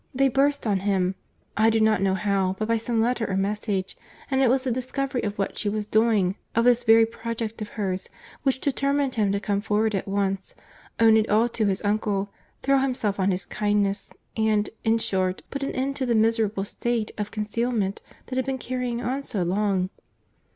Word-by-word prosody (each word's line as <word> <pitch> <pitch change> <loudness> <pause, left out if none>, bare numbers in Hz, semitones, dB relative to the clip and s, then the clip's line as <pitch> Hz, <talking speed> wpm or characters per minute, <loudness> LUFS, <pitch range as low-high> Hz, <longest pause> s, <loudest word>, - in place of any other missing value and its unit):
They 270 +1 +4
burst 280 +2 +2
on 205 -3 +1
him, 190 -1 +1 0.4
I 220 +1 +4
do 225 0 +2
not 220 -2 +3
know 190 -1 +2
how, 195 -1 0
but 215 - -2
by 230 0 +2
some 225 0 0
letter 235 -1 0
or 190 - 0
message—and 205 +6 -2
it 260 - +4
was 260 +1 +2
the 260 - -1
discovery 255 +2 -2
of 205 -1 -3
what 195 - -2
she 205 - 0
was 210 0 -2
doing, 215 -3 +2 0.2
of 230 +1 +3
this 245 0 +4
very 225 -1 +6
project 225 0 -5
of 210 - -4
hers, 190 -3 -2 0.3
which 265 -2 +1
determined 280 -1 0
him 210 -3 +1
to 200 - 0
come 200 -1 -1
forward 215 +1 +1
at 195 - -2
once, 195 -1 -2 0.4
own 225 -1 +6
it 220 0 +1
all 220 +3 +4
to 220 -2 0
his 190 -1 0
uncle, 205 -1 0 0.3
throw 275 0 +4
himself 245 -7 -1
on 190 +1 +2
his 185 0 -1
kindness, 205 -1 0 0.2
and, 215 -2 +1
in 225 0 +3
short, 185 -4 -1
put 275 - -4
an 275 - -1
end 275 +1 -1
to 260 - -1
the 235 - +2
miserable 220 -2 +2
state 230 +2 -2
of 210 0 -2
concealment 215 -1 -2 0.2
that 255 - -5
had 260 - +1
been 270 -1 -1
carrying 250 -1 -3
on 260 +3 -1
so 205 -9 -1
long." 190 0 0
220 Hz, 200 wpm, -25 LUFS, 200-245 Hz, 0.4 s, very